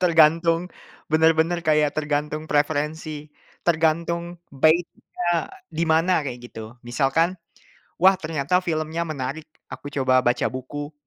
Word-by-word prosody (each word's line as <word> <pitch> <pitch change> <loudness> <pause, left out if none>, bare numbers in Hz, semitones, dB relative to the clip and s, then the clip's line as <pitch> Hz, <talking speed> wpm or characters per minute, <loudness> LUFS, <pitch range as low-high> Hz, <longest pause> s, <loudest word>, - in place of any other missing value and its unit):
tergantung 165 0 +4 0.4
benar-benar 160 +2 +3
kayak 150 -1 +2
tergantung 150 0 -2
preferensi, 150 0 -2 0.3
tergantung 170 +1 0 0.2
bait-nya 170 +3 0 0.2
di 165 +1 0
mana 165 +2 +3
kayak 130 -3 -4
gitu 110 +1 -10
misalkan, 135 +8 +1 0.7
"Wah, 190 +3 +6
ternyata 155 +2 0
filmnya 165 -2 -2
menarik 150 +1 -5 0.2
aku - - -8
coba 130 -2 +3
baca 120 0 +2
buku." 145 +3 -6
155 Hz, 110 wpm, -23 LUFS, 145-165 Hz, 0.7 s, Wah